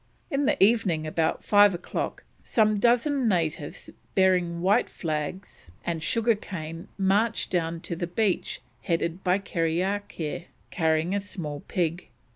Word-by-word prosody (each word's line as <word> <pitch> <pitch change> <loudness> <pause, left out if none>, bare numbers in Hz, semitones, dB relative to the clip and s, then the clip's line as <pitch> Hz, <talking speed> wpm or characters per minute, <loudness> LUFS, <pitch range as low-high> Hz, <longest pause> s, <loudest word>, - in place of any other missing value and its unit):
In 280 -1 +1
the - - +2
evening, 195 -7 +3
about 160 +1 0
five 205 -2 +6
o'clock, 175 - -4 0.2
some 215 -2 +2
dozen 245 +3 +3
natives 160 -6 -1 0.2
bearing 180 -3 +3
white 195 +3 +3
flags 155 - -5 0.2
and 165 -2 -2
sugar 230 +8 +2
cane 165 -5 -7
marched 205 +4 +1
down 165 -2 -1
to 170 - -4
the 175 +1 -3
beach 195 +2 0 0.2
headed 170 +1 -1
by 180 0 +3
Kerriakair 175 -2 -2 0.3
carrying 160 +1 +1
a 200 - 0
small 165 -7 -5
pig. 175 -1 -1
180 Hz, 130 wpm, -27 LUFS, 165-205 Hz, 0.3 s, five